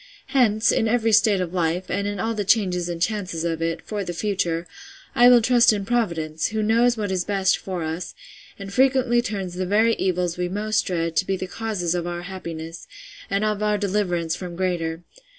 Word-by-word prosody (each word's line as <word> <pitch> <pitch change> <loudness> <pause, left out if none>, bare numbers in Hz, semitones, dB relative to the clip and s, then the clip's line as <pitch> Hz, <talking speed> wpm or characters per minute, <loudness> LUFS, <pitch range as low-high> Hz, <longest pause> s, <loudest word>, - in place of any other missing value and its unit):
—Hence, 225 -5 +3
in 225 - +1
every 225 0 +2
state 210 -2 +4
of 180 -1 -4
life, 175 +1 0
and 200 0 -2
in 205 0 -3
all 225 +1 -1
the 210 -2 -2
changes 185 -4 +1
and 170 -1 -4
chances 185 -4 -2
of 165 -1 -2
it, 165 0 -2
for 210 -2 -4
the 175 -2 -5
future, 175 -4 -1 0.5
will 245 0 +7
I - - +3
trust 240 +1 +5
in 205 -2 -2
Providence, 165 -10 -1
who 215 0 -2
knows 235 +2 +3
what 205 -2 -2
is 185 -2 0
best 195 -2 +2
for 185 -3 -4
us, 160 +3 -5 0.4
and 195 0 -8
frequently 255 -1 +3
turns 195 -6 -4
the 185 +1 -3
very 220 +4 +3
evils 180 -2 -1
we 180 0 -1
most 210 +3 -1
dread, 165 -2 -2
to - - +3
be 195 - 0
the 185 - -4
causes 185 -3 -2
of 175 -1 -2
our 175 0 -4
happiness, 165 -3 -7 0.4
and 200 +2 0
of 210 -1 -1
our 210 0 +1
deliverance 185 -5 -1
from 180 -2 -7
greater. 170 -2 -2
190 Hz, 205 wpm, -23 LUFS, 175-215 Hz, 0.5 s, will